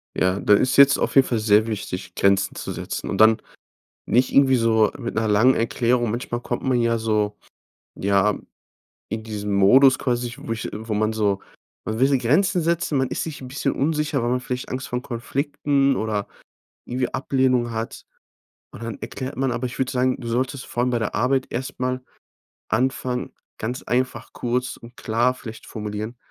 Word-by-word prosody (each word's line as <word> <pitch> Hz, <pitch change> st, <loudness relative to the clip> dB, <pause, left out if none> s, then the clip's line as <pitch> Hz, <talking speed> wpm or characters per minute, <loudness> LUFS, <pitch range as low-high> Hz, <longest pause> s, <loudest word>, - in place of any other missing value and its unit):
Ja, 95 Hz, +1 st, +1 dB
da 105 Hz, -, +4 dB
ist 125 Hz, +5 st, +3 dB
jetzt 140 Hz, 0 st, +7 dB
auf -, -, -1 dB
jeden 135 Hz, -1 st, +6 dB
Fall 115 Hz, -, 0 dB
sehr 110 Hz, 0 st, +4 dB
wichtig, 95 Hz, -3 st, -5 dB
Grenzen 100 Hz, 0 st, +2 dB
zu -, -, -5 dB
setzen -, -, -5 dB
und -, -, -2 dB
dann 110 Hz, 0 st, +7 dB, 0.7 s
nicht 125 Hz, +2 st, +2 dB
irgendwie 135 Hz, -1 st, +5 dB
so 110 Hz, -2 st, +3 dB
mit 120 Hz, -, -5 dB
'ner 110 Hz, 0 st, +1 dB
langen 110 Hz, +5 st, +4 dB
Erklärung. 120 Hz, 0 st, +1 dB
Manchmal 120 Hz, 0 st, -3 dB
kommt 120 Hz, -, -4 dB
man 130 Hz, -2 st, +2 dB
ja 115 Hz, 0 st, +2 dB
so, 105 Hz, -2 st, 0 dB, 0.6 s
ja, 100 Hz, +1 st, +2 dB, 0.7 s
in 110 Hz, +1 st, -4 dB
diesen 105 Hz, -2 st, -4 dB
Modus 130 Hz, +7 st, +6 dB
quasi, 120 Hz, -2 st, -1 dB
wo 140 Hz, -5 st, -7 dB
ich 115 Hz, -, -5 dB
wo 110 Hz, +1 st, -4 dB
man 110 Hz, +1 st, +1 dB
so, 105 Hz, -3 st, +1 dB, 0.5 s
man 110 Hz, +1 st, -3 dB
will 135 Hz, -, +4 dB
die 135 Hz, -, +3 dB
Grenzen 175 Hz, -, +2 dB
setzen. 165 Hz, -2 st, 0 dB
Man 130 Hz, -1 st, +1 dB
ist -, -, -2 dB
sich 155 Hz, -4 st, -6 dB
’n 130 Hz, -, -7 dB
bisschen 135 Hz, +1 st, -1 dB
unsicher, 150 Hz, -2 st, 0 dB
weil 120 Hz, -, 0 dB
man 125 Hz, -, +1 dB
vielleicht 125 Hz, 0 st, -5 dB
Angst 130 Hz, +1 st, -4 dB
vor 125 Hz, 0 st, -3 dB
Konflikten 140 Hz, +2 st, 0 dB
oder 110 Hz, -3 st, -2 dB, 0.6 s
irgendwie 125 Hz, 0 st, -2 dB
Ablehnung 130 Hz, -3 st, +1 dB
hat. 115 Hz, 0 st, -5 dB, 0.7 s
Und 115 Hz, -, -10 dB
dann 115 Hz, -1 st, -5 dB
erklärt 130 Hz, +4 st, -5 dB
man 135 Hz, -1 st, +1 dB
aber 120 Hz, +1 st, -2 dB
ich 125 Hz, +2 st, -6 dB
würde 130 Hz, -, 0 dB
sagen, 130 Hz, 0 st, +1 dB
du 120 Hz, -, -7 dB
solltest 125 Hz, +3 st, -2 dB
vor 120 Hz, -, -2 dB
allem 125 Hz, -, +1 dB
bei 120 Hz, -, +1 dB
der 110 Hz, -, -2 dB
Arbeit 130 Hz, +3 st, +1 dB
erst 130 Hz, +2 st, -5 dB
mal 130 Hz, 0 st, -1 dB, 0.7 s
anfangen, 125 Hz, +1 st, -1 dB, 0.3 s
ganz 125 Hz, +4 st, -4 dB
einfach, 130 Hz, +1 st, -2 dB
kurz 125 Hz, +1 st, -2 dB
und 115 Hz, +1 st, -14 dB
klar 120 Hz, +3 st, +1 dB
vielleicht 110 Hz, -3 st, -10 dB
formulieren, 105 Hz, +2 st, -5 dB
120 Hz, 185 wpm, -23 LUFS, 110-130 Hz, 0.7 s, jetzt